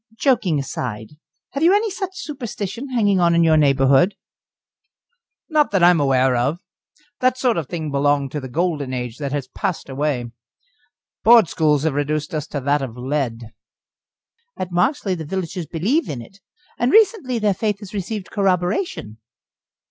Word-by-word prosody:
"Joking 215 - +2
apart, 120 -5 -5 0.4
have 275 - -4
you 350 +5 +5
any 425 0 +1
such 380 -1 -5
superstition 240 -3 -5
hanging 205 -6 +2
on 170 -1 +3
in 170 - +4
your 160 -1 +4
neighbourhood?" 140 +5 +4 1.3
"Not 305 -3 +2
that 195 -3 +1
I 175 - +8
am 170 - +2
aware 130 -2 +3
of. 130 +7 0 0.6
That 255 0 +2
sort 250 -2 +1
of 160 -5 -3
thing 160 -4 -4
belonged 140 -1 +1
to 150 - -3
the 130 -2 -8
Golden 145 -3 -1
Age 125 -1 -5
that 140 -2 -3
has 140 -2 -3
passed 170 +1 -4
away. 135 -3 -2 0.9
Board 230 -4 +7
schools 150 -3 +2
have 160 -3 +1
reduced 150 +4 -2
us 155 0 -3
to 145 - -4
that 145 +2 +1
of 125 -3 -6
lead." 125 -4 -3 1.0
"At 185 -1 -4
Marksleigh 185 - 0
the - - -4
villagers 175 0 -4
believe 210 - 0
in 135 - -4
it, 195 +12 -13 0.4
and 240 - +2
recently 410 - +3
their 210 -2 +2
faith 210 +1 -1
has 205 -1 -11
received 200 0 -5
corroboration." 180 - -1
170 Hz, 165 wpm, -21 LUFS, 140-215 Hz, 1.3 s, I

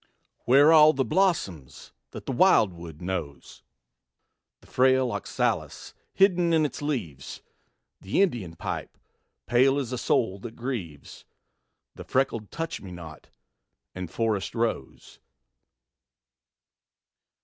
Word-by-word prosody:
Where 140 +6 +6
all 155 -1 +7
the 135 -2 0
blossoms 100 - -1 0.2
that - - -10
the - - -3
wildwood 90 - +2
knows? 85 -6 -6 1.0
The - - -21
frail 130 -1 +2
oxalis 110 - -3 0.2
hidden 180 -3 +3
in 160 -1 +3
its 145 - -5
leaves; 115 - -5 0.6
The 100 - +1
Indian 110 - -3
pipe, - - -6 0.5
pale 130 +3 +3
as 130 -4 -3
a 125 - -3
soul 100 -4 0
that 115 +3 -9
grieves; 110 - -6 0.7
The - - -10
freckled 115 -5 -1
touch 165 0 -5
me 95 - -10
not 80 -3 -11 0.6
and 90 -2 -6
forest 110 0 -2
rose. 115 - -4
120 Hz, 110 wpm, -26 LUFS, 90-140 Hz, 1.0 s, all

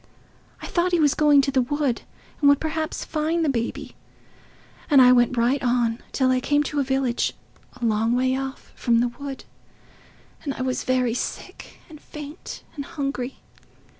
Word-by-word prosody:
I - - -4
thought 355 +1 0
he 350 - +4
was 295 -3 +4
going 295 -2 +5
to 275 - -1
the 260 -1 +3
wood 280 -1 -1 0.4
and 285 - +5
would 285 0 +5
perhaps 315 0 -3
find 320 +1 0
the - - +2
baby. 235 -3 -3 1.0
And 285 -3 +6
I 250 -1 +8
went 245 0 +3
right 245 +4 +2
on, 240 -2 +1
till 260 -1 +2
I 255 - +2
came 290 +3 +1
to 295 0 -2
a - - +3
village, 265 -2 0 0.5
a 240 - -2
long 225 +2 +2
way 255 +1 +2
off 270 0 -6
from 235 -2 +2
the 240 +1 +2
wood, 275 +2 -8 1.0
and 280 -3 -3
I 255 - -3
was 255 -1 -2
very 255 -2 +1
sick, 245 - -6
and 305 -3 -13
faint, 300 +2 -9
and 285 - -4
hungry. 275 -4 -4
270 Hz, 175 wpm, -24 LUFS, 245-295 Hz, 1.0 s, I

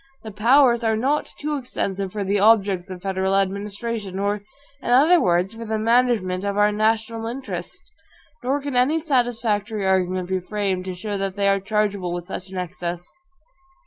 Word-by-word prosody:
The 220 - -7
POWERS 235 +3 +4
are 220 -1 +2
not 275 +6 0
too 300 0 -2
extensive 200 -7 -3
for 205 0 -3
the 200 +1 +1
OBJECTS 200 -3 +3
of 185 -1 -8
federal 190 0 0
administration, 200 +1 -2
or, 200 +1 -1 0.4
in - - -5
other 305 +8 +6
words, 180 +3 +1
for 230 +1 -8
the 220 -1 -2
management 220 -5 +2
of 200 0 -2
our 210 0 +4
NATIONAL 225 +1 0
INTERESTS; 260 +3 -7 0.5
nor 270 +3 0
can 280 -2 -4
any 265 +6 +3
satisfactory 225 -8 0
argument 185 -1 +1
be 190 0 0
framed 190 -1 -2
to 185 -1 -4
show 205 +2 -4
that 195 -1 -2
they 200 -1 +1
are 195 0 +3
chargeable 200 -3 -1
with 175 -1 -4
such 185 +1 -7
an 190 - -7
excess. 175 0 -5
205 Hz, 175 wpm, -23 LUFS, 190-230 Hz, 0.5 s, other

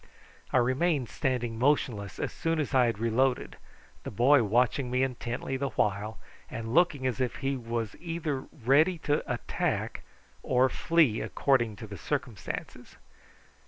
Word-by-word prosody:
I - - +3
remained 130 +2 +1
standing 120 -5 -2
motionless 120 -7 +1
as - - -3
soon 165 -1 -1
as 145 -2 -2
I 130 -2 +5
had 115 - -1
reloaded, 120 +4 0 0.4
the - - -6
boy 130 +6 +5
watching 125 +4 +1
me 125 +1 +1
intently 125 0 -3
the 140 +1 -1
while 105 0 -1 0.3
and 115 0 -5
looking 155 -5 +3
as 130 0 -1
if 125 - -1
he 135 0 -1
was 115 -3 -3
either 165 -5 -3 0.2
ready 155 +8 +4
to 150 -1 0
attack - - -2 0.4
or 130 +1 +3
flee 155 -6 +2
according 120 -6 +1
to 105 -1 -8
circumstances. 125 -8 -5
130 Hz, 140 wpm, -29 LUFS, 115-140 Hz, 0.4 s, I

